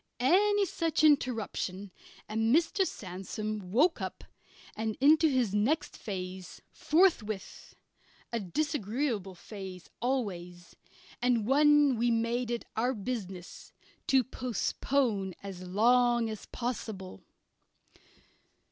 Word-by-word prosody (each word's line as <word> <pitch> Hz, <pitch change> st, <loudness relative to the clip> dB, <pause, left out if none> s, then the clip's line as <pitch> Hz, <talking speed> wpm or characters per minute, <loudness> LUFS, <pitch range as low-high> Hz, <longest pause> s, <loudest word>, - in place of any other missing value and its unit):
Any 400 Hz, +10 st, +4 dB
such 330 Hz, -3 st, -1 dB
interruption 225 Hz, -9 st, +1 dB, 0.4 s
and 225 Hz, +3 st, +2 dB
Mr. 345 Hz, +3 st, +2 dB
Sandsome 195 Hz, +1 st, -5 dB
woke 310 Hz, -, +3 dB
up -, -, -5 dB, 0.5 s
and 220 Hz, 0 st, -3 dB
into 310 Hz, +4 st, +5 dB
his 250 Hz, -7 st, +1 dB
next 230 Hz, +10 st, +1 dB
phase 185 Hz, -2 st, -6 dB
forthwith 300 Hz, -, 0 dB, 0.6 s
a 235 Hz, -, 0 dB
disagreeable 225 Hz, -, -2 dB
phase 185 Hz, -1 st, -9 dB
always, 180 Hz, -9 st, -3 dB, 0.5 s
and 240 Hz, -3 st, +2 dB
one 290 Hz, 0 st, +5 dB
we 240 Hz, +2 st, +2 dB
made 230 Hz, +1 st, 0 dB
it 235 Hz, -1 st, -3 dB
our 245 Hz, +4 st, +1 dB
business 195 Hz, -5 st, -6 dB, 0.3 s
to 265 Hz, -2 st, +4 dB
postpone 240 Hz, -4 st, -1 dB
as 195 Hz, -2 st, -7 dB
long 240 Hz, +3 st, +3 dB
as 215 Hz, -, -8 dB
possible. 220 Hz, -, -5 dB
230 Hz, 100 wpm, -30 LUFS, 195-270 Hz, 0.6 s, into